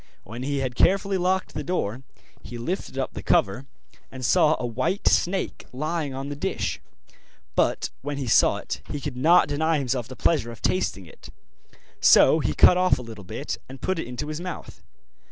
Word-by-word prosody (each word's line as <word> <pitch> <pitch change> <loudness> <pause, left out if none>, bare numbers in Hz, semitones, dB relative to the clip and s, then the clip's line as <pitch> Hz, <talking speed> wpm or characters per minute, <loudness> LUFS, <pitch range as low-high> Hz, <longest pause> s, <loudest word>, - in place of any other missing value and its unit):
When 115 +5 -8
he 140 +1 -1
had 130 -2 -2
carefully 195 +7 +2
locked 185 +1 0
the 150 - -4
door, 130 - -2 0.4
he 120 - -8
lifted 135 +3 -4
up 135 - -2
the - - -6
cover, 120 +8 +1 0.4
and 130 -1 -6
saw 155 +6 +4
a - - -2
white 130 - -1
snake 190 +2 0
lying 155 +2 -2
on 135 +1 -5
the 145 - -4
dish. 145 - -3 0.7
But - - +1
when 145 +1 -4
he 140 - -3
saw 115 - +4
it - - -6
he 145 - -3
could 140 -2 -5
not 165 +8 +5
deny 160 +2 +1
himself 125 -4 -2
the 130 - -9
pleasure 130 -7 +1
of 115 - -11
tasting 95 - -1
it, 80 - -14 0.7
so - - +6
he - - -1
cut 180 - +7
of 185 -6 +3
a 125 - -7
little 110 -3 -10
bit 90 - -5
and 135 0 -10
put 185 +5 -1
it 160 - -4
into 125 +4 -5
his 155 +2 -5
mouth. 180 -1 -7
140 Hz, 190 wpm, -25 LUFS, 125-170 Hz, 0.7 s, cut